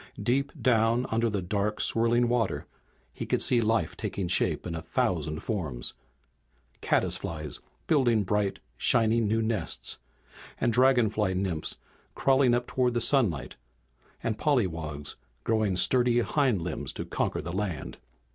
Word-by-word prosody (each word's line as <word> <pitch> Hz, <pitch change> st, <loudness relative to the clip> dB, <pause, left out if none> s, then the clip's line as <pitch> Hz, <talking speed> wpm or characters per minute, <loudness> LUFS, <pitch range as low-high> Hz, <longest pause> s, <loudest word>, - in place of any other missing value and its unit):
Deep 140 Hz, +3 st, +1 dB
down 115 Hz, 0 st, +3 dB
under 115 Hz, +1 st, +2 dB
the 100 Hz, -3 st, -2 dB
dark, 105 Hz, +3 st, -1 dB
swirling 120 Hz, +1 st, +3 dB
water 120 Hz, -3 st, 0 dB, 0.5 s
he -, -, -5 dB
could -, -, +1 dB
see 120 Hz, -2 st, +2 dB
life 110 Hz, -7 st, +1 dB
taking 95 Hz, -3 st, -3 dB
shape 90 Hz, -, +1 dB
in 85 Hz, -, -4 dB
a 80 Hz, -, -4 dB
thousand 80 Hz, -1 st, -1 dB
forms. 80 Hz, -, -2 dB, 0.9 s
Caddis -, -, +1 dB
flies 75 Hz, -3 st, -6 dB, 0.3 s
building 120 Hz, -8 st, +3 dB
bright, 100 Hz, 0 st, 0 dB, 0.2 s
shining 115 Hz, -, +3 dB
new 110 Hz, +2 st, +1 dB
nests, 110 Hz, -1 st, -2 dB, 0.6 s
and 120 Hz, -, +1 dB
dragonfly 110 Hz, -6 st, +3 dB
nymphs 90 Hz, -5 st, -2 dB, 0.4 s
crawling 130 Hz, -2 st, +4 dB
up 120 Hz, 0 st, -1 dB
toward 125 Hz, -1 st, 0 dB
the -, -, +3 dB
sunlight, 115 Hz, -, +1 dB, 0.7 s
and 110 Hz, -2 st, -2 dB
pollywogs 80 Hz, -, -1 dB, 0.3 s
growing 110 Hz, -4 st, +1 dB
sturdy 120 Hz, +3 st, +3 dB
hindlimbs 115 Hz, -, 0 dB
to -, -, -5 dB
conquer -, -, -2 dB
the 85 Hz, +2 st, -5 dB
land. 95 Hz, -4 st, -4 dB
110 Hz, 135 wpm, -28 LUFS, 90-120 Hz, 0.9 s, crawling